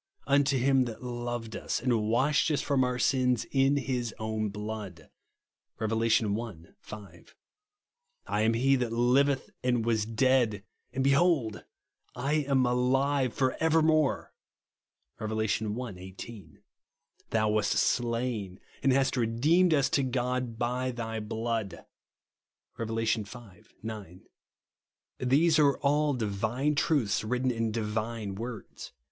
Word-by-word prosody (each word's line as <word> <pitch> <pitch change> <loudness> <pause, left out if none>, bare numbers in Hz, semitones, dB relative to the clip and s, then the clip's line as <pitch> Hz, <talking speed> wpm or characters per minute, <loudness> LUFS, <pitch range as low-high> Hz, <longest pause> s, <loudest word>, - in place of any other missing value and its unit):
Unto 140 -1 +3
him 130 0 +3
that 115 0 -7
loved 120 -2 -4
us, - - -2
and 115 -4 0
washed 135 +8 +2
us 150 - +1
from 140 -3 +1
our 125 0 -1
sins 125 -2 +1
in 135 +1 +3
Ms 125 -4 -2
oiun 110 -1 -2
blood" 105 -5 -7 0.7
(Rev. 110 0 -2
i. 115 +1 +1 0.7
5). 100 -6 -12 0.5
" 485 +1 -52
I 105 - -1
am 110 +1 +2
He 135 +4 +3
that 125 -2 -2
liveth 130 +4 +2
and 120 -3 +1
was 110 -2 +1
dead, 115 -3 +2 0.3
and 130 - -1
behold 140 -6 +2 0.3
/ - - -25
ain 140 +3 0
alive 130 +1 +2
for 130 -1 +1
evermore" 160 -2 +2 0.9
(Rev. 110 -1 -3
i. 110 +1 -2
18). 95 -2 -11 0.3
" - - -38
Thou 110 -1 +1
wast 105 -1 +1
slain, 115 -5 -1 0.2
and 135 - +3
hast 135 0 +2
redeemed 140 +10 +3
us 140 -4 +3
to 140 - +3
God 125 -2 -2
by 125 +2 -1
thy 115 -2 -4
blood," 110 -1 -3 0.9
(Rev. 115 -1 -4
V. 115 -1 0 0.6
9). 105 -5 -7 1.0
These 155 +6 +3
are 140 -2 +4
all 145 +1 +2
divine 115 +6 -1
truths 140 -9 +1
written 125 +3 0
in 115 -2 -1
divine 110 -1 -3
words. 115 +2 -8
120 Hz, 130 wpm, -29 LUFS, 110-135 Hz, 1.0 s, are